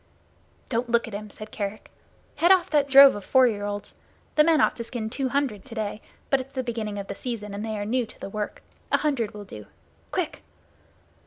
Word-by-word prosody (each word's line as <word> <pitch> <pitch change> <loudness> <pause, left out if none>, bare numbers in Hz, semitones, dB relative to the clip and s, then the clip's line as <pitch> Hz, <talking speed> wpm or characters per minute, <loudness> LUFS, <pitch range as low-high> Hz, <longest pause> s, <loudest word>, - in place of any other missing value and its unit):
"Don't 240 0 -1
look 235 0 +2
at 225 - -9
him," 210 +1 -6
said 215 +1 -9
Kerick. 205 0 -5 0.5
"Head 345 +3 +5
off 370 -5 +4
that 290 -2 +3
drove 275 0 +9
of 205 - -6
four 260 +5 +5
year 205 -4 0
olds. 205 0 -5 0.4
The 300 - +6
men 320 -1 +4
ought - - +3
to 235 - -3
skin 225 -2 -4
two 265 +1 -1
hundred 250 -7 -1
to 230 - -9
day, 215 -1 -3 0.3
but 275 -1 +4
it's 270 +1 -13
the 260 - -1
beginning 225 -4 -3
of 200 - -4
the - - -5
season 215 -5 -5
and 200 +1 -4
they 220 -1 -3
are 205 - -3
new 240 +2 0
to - - -16
the - - -6
work. 210 +1 -5 0.3
A - - +5
hundred 255 -9 -1
will 205 -1 -8
do. 105 - -10 0.4
Quick!" - - -2
230 Hz, 225 wpm, -26 LUFS, 210-265 Hz, 0.5 s, drove